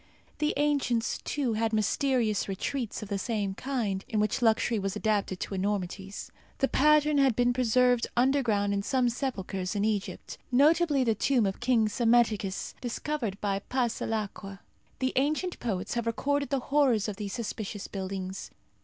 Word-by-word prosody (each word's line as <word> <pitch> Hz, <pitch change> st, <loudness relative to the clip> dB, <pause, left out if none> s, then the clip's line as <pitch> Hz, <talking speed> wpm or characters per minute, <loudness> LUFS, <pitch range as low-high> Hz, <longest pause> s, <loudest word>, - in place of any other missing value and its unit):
The 300 Hz, 0 st, +1 dB
ancients, 280 Hz, -6 st, +1 dB
too, 270 Hz, -6 st, -1 dB
had 225 Hz, +1 st, 0 dB
mysterious 220 Hz, 0 st, +1 dB
retreats 215 Hz, +4 st, -3 dB
of 205 Hz, -, -9 dB
the 200 Hz, -1 st, -1 dB
same 205 Hz, -2 st, -2 dB
kind, 220 Hz, -6 st, -2 dB
in 215 Hz, -, 0 dB
which 210 Hz, +2 st, 0 dB
luxury 225 Hz, -1 st, +2 dB
was 195 Hz, 0 st, -2 dB
adapted 210 Hz, -3 st, 0 dB
to -, -, -4 dB
enormities. 195 Hz, 0 st, -3 dB, 0.3 s
The 270 Hz, -, +2 dB
pattern 300 Hz, +1 st, +4 dB
has 270 Hz, -3 st, +4 dB
been 245 Hz, +2 st, +2 dB
preserved 250 Hz, 0 st, +3 dB
underground 240 Hz, -6 st, +2 dB
in 200 Hz, -, 0 dB
some 250 Hz, +3 st, +1 dB
sepulchres 195 Hz, -7 st, -3 dB
in 205 Hz, 0 st, +1 dB
Egypt, 200 Hz, -4 st, -3 dB
notably 295 Hz, +2 st, +4 dB
in -, -, +1 dB
the 225 Hz, -, +3 dB
tomb 240 Hz, +1 st, +2 dB
of 195 Hz, 0 st, -2 dB
King 240 Hz, -3 st, +3 dB
Psammetichus, 225 Hz, -4 st, +1 dB
discovered 240 Hz, -4 st, -3 dB
by 195 Hz, -1 st, 0 dB
Passalacqua. 220 Hz, -5 st, -2 dB, 0.4 s
The 260 Hz, 0 st, -1 dB
ancient 305 Hz, +6 st, 0 dB
poets 205 Hz, -4 st, -2 dB
have 235 Hz, -1 st, -2 dB
recorded 285 Hz, +4 st, 0 dB
the 275 Hz, -, +1 dB
horrors 255 Hz, -8 st, +3 dB
of 205 Hz, -2 st, -4 dB
these 205 Hz, -2 st, -5 dB
suspicious 215 Hz, -3 st, -5 dB
buildings. 190 Hz, -1 st, -5 dB
225 Hz, 155 wpm, -28 LUFS, 200-260 Hz, 0.4 s, pattern